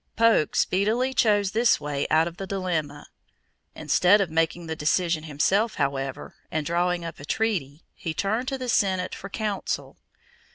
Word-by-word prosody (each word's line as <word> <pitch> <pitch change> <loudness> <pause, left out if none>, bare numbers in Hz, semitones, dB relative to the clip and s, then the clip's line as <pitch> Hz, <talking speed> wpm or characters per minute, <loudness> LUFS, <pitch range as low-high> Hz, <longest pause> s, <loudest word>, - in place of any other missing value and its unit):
Polk 225 -9 +3
speedily 225 +8 +1
chose 205 -6 +2
this 230 +3 +3
way 145 -1 -2
out 160 +2 +3
of 170 0 -8
the 195 - -6
dilemma. 170 -7 -3 0.7
Instead 185 +4 +4
of 190 -5 -1
making 165 +1 0
the 160 0 -4
decision 160 +1 0
himself, 195 +9 +1
however, 135 -1 -3 0.2
and 155 -1 -2
drawing 175 +1 0
up 165 - -7
a - - -10
treaty, 160 -5 -2
he 165 - -5
turned 215 +9 -1
to 270 - -2
the 255 -1 -5
Senate 190 -5 +1
for 195 - -7
"counsel." 205 -1 -3
180 Hz, 160 wpm, -25 LUFS, 155-210 Hz, 0.7 s, Instead